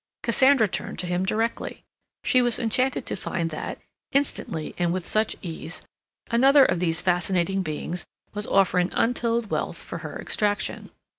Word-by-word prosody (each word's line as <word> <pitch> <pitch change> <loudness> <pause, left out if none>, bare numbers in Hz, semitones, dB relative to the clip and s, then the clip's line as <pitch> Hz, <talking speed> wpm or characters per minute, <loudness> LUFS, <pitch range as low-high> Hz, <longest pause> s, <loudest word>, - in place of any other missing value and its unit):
Cassandra 255 0 +5
turned - - -5
to 180 - -2
him 180 +1 -1
directly. 225 +3 -2 0.4
She 255 - +4
was 240 -2 +3
enchanted 250 +3 0
to - - -2
find 170 -3 -3
that, 155 - -5 0.3
instantly 220 - -1
and 175 -1 +2
with 180 0 -2
such 215 0 +1
ease, 165 -1 -5 0.5
another 270 +4 +6
of 175 - +1
these 165 -1 +2
fascinating 180 +1 +1
beings 165 +1 -3 0.3
was 210 0 -2
offering 180 -2 +3
untold 235 -2 +1
wealth - - -1
for - - -7
her - - -7
extraction. 210 -1 -1
195 Hz, 150 wpm, -25 LUFS, 175-235 Hz, 0.5 s, another